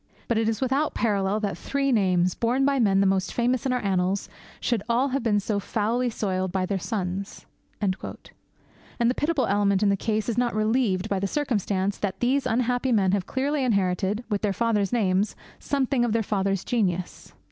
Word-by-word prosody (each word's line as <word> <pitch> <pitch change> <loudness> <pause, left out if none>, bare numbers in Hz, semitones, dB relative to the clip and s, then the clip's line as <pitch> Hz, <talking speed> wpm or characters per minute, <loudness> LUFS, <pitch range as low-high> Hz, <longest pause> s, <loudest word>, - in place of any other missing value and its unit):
But 230 -2 +1
it 225 0 +1
is 225 +1 -2
without 270 +4 0
parallel 205 -2 +1
that 200 -3 -1
three 275 +9 -1
names, 185 -5 +2
borne 250 +4 +1
by 275 -1 +2
men 195 -4 +3
the - - +3
most 190 0 +1
famous 245 +2 +1
in - - 0
our 250 -2 -1
annals, 190 0 0 0.3
should 235 -4 0
all 250 +4 +2
have 275 +2 -1
been 215 -3 +2
so 205 0 -1
foully 230 +5 0
soiled 190 -4 -2
by 185 0 0
their 195 +1 -2
sons.' 195 -1 -4 0.3
And 200 -3 +1
the 235 +5 -6
pitiable 300 -3 +1
element 200 0 +2
in 205 - +4
the 200 - +3
case 215 +1 -1
is 235 0 0
not 245 -2 0
relieved 215 -3 +1
by 200 -2 -1
the 200 - -1
circumstance 205 -7 -1
that 190 -2 -3
these 260 +3 +1
unhappy 245 +2 0
men 195 -5 +3
have 195 -2 -1
clearly 275 +2 -1
inherited, 200 -1 0
with 205 -3 -1
their 205 -2 0
fathers' 210 -2 +1
names, 200 -3 +1 0.2
something 270 -3 0
of 235 -3 0
their 230 -1 +1
fathers' 195 -2 -1
genius. 185 -7 -2
215 Hz, 190 wpm, -25 LUFS, 195-245 Hz, 0.3 s, in